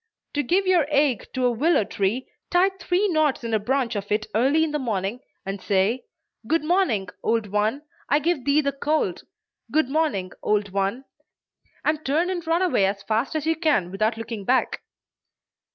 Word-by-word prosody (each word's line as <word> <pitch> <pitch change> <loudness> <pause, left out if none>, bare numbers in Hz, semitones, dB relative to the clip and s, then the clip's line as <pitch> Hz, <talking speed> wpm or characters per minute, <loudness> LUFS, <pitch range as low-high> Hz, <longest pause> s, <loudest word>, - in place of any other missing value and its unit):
To 290 - +1
give 360 +9 +1
your 355 -6 +3
ague 280 -5 +2
to 255 -1 +1
a 245 - +4
willow 285 +3 +2
tree, 200 +6 -1 0.2
tie 365 +2 +4
three 380 +1 0
knots 310 -6 +1
in 230 -1 -3
a 220 - +3
branch 250 +2 0
of 200 0 -4
it 215 +1 +1
early 275 +8 +3
in 320 - -1
the 300 - -1
morning, 215 -2 -2 0.3
and 195 0 -4
say, 205 +5 +1 0.4
"Good 325 0 +1
morning, 305 - +1
old 225 -1 +1
one! 210 +7 0 0.3
I 290 - +4
give 305 -2 0
thee 285 +3 +3
the 280 -1 0
cold; 280 - -1 0.5
good 310 -4 +2
morning, 275 - 0
old 210 -1 +1
one!" 200 +7 -1 0.8
and 305 0 +1
turn 325 +7 +1
and 350 -3 -4
run 335 +3 +2
away 210 - +3
as 195 0 -3
fast 225 +8 -1
as 310 -1 -1
you 325 0 +2
can 300 - +1
without 215 +4 0
looking 225 -2 -5
back. 255 +6 +1
260 Hz, 185 wpm, -24 LUFS, 210-310 Hz, 0.8 s, a